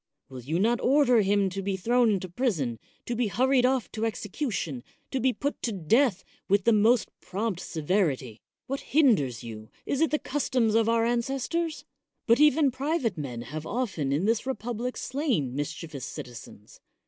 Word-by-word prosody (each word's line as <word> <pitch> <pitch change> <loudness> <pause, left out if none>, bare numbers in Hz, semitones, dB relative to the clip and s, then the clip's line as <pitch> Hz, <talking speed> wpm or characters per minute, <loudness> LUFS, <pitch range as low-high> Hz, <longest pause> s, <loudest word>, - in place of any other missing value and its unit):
Will 130 -2 -8
you 150 +7 -2
not 230 +5 +2
order 255 -3 +4
him 200 0 +2
to 195 +2 -4
be 195 0 -2
thrown 240 +4 +3
into 190 -3 0
prison, 170 - -1 0.3
to 240 - -2
be 235 -1 +1
hurried 255 +4 +3
off 260 -2 0
to 220 - -4
execution, 210 - -3 0.3
to 265 - -1
be 260 +1 +3
put 285 +3 -3
to 235 - -1
death 200 - +2 0.3
with 200 0 +3
the 230 - +4
most 220 +3 +3
prompt 200 -1 -3
severity? 150 - -1 0.2
What 275 +1 -3
hinders 215 - +2
you? 110 -2 -9 0.2
Is 280 - -1
it 325 - +4
the 300 - +1
customs 255 -6 0
of 225 0 +3
our 230 0 +3
ances 240 +2 -1
tors? 325 -3 -2 0.4
But 230 +2 +4
even 300 -2 +5
private 265 - -1
men 125 -7 -5
have 155 +5 -6
often 190 - -2
in 150 +7 +1
this 225 +3 +1
republic 245 0 -3
slain 250 - -1
mischievous 145 -1 -5
citizens. 115 -3 -10
225 Hz, 170 wpm, -27 LUFS, 160-255 Hz, 0.4 s, even